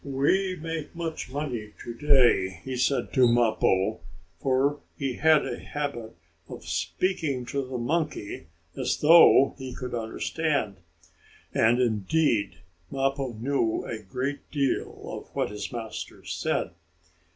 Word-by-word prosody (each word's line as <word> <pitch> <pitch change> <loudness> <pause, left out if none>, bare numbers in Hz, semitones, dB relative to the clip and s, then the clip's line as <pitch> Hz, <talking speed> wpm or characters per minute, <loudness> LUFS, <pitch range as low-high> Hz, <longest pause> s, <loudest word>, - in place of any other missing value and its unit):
"We 165 +8 +1
make 165 -1 -5
much 165 -5 -4
money 125 -7 -4
to 120 - -6
day," 120 - +3
he 130 -1 -3
said 130 +2 0
to 130 -2 +5
Mappo, 110 -3 +2 0.4
for 135 +2 +1 0.2
he 135 -3 -2
had 155 -1 +4
a - - -4
habit 120 -6 -5 0.3
of - - -9
speaking 125 - -1
to 140 +2 -2
the 130 -1 -5
monkey 140 - -2 0.3
as - - -1
though 155 -3 +7
he 130 -1 -6
could 125 -2 -6
understand. 120 - -1 0.8
And 120 +2 +4
indeed, 115 - +1 0.3
Mappo 135 -1 -1
knew 115 0 0
a 110 -2 -5
great 130 +8 -4
deal 140 -3 -1
of - - -7
what - - 0
his 105 - -5
master 115 -3 -7
said. - - -1
130 Hz, 130 wpm, -27 LUFS, 110-145 Hz, 0.8 s, though